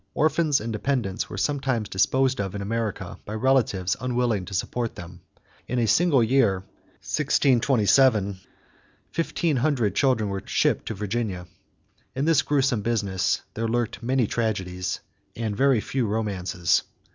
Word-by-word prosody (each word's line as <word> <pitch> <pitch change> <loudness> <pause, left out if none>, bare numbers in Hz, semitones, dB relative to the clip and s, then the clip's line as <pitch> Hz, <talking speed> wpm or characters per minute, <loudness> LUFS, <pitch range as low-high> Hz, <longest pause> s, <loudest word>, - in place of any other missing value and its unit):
Orphans 155 -1 +2
and 110 +1 -4
dependents 110 -3 -2
were - - -6
sometimes 135 -6 -1
disposed 130 +6 +1
of 95 0 -4
in 100 - -4
America 105 -4 -3
by 105 - -6
relatives 110 -6 +1
unwilling 120 -6 0
to 100 - -9
support 115 +5 -2
them. 85 +1 -10 0.5
In 125 - -2
a 120 - +2
single 135 - +4
year, 110 -6 +2 0.4
1627, 125 -3 +3
about 100 - -5 0.8
fifteen 165 -2 0
hundred 120 - +1
children 125 -4 +2
were 95 0 -3
shipped - - 0
to 110 - -3
Virginia. 105 -2 -3 0.7
In 135 +2 0
this 160 -2 +4
gruesome 135 -6 +1
business 100 -4 0
there 115 +1 -2
lurked 120 0 -1
many 125 +1 +1
tragedies, 95 -6 -2 0.3
and 110 -3 -3
very 135 0 +3
few 125 +2 -2
romances. 95 -5 0
115 Hz, 140 wpm, -25 LUFS, 100-130 Hz, 0.8 s, single